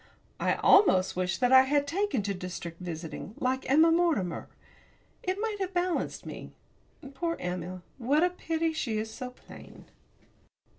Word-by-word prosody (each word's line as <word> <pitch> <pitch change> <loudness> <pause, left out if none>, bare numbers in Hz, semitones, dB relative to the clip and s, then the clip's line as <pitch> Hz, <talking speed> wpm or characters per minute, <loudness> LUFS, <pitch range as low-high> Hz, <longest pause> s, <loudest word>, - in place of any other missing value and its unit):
I - - +2
almost 195 - +5
wish 185 +1 -1
that 250 -1 +2
I 260 0 +9
had 285 +2 +1
taken 325 - -1
to 200 0 -1
district 180 -2 -7
visiting, 170 +4 -6
like 260 +1 -1
Emma 315 +4 +6
Mortimer 325 - +1 0.7
it 370 +1 -2
might 435 -1 -2
have 380 -1 -3
balanced 355 0 -1
me. - - -8 0.6
Poor 335 +5 -2
Emma! 180 0 -5 0.2
what 280 +7 +2
a 355 - +3
pity 325 -2 -1
she 235 -8 -2
is 220 +1 -4
so 255 -2 -6
plain. 250 - -14
260 Hz, 150 wpm, -29 LUFS, -, 0.7 s, I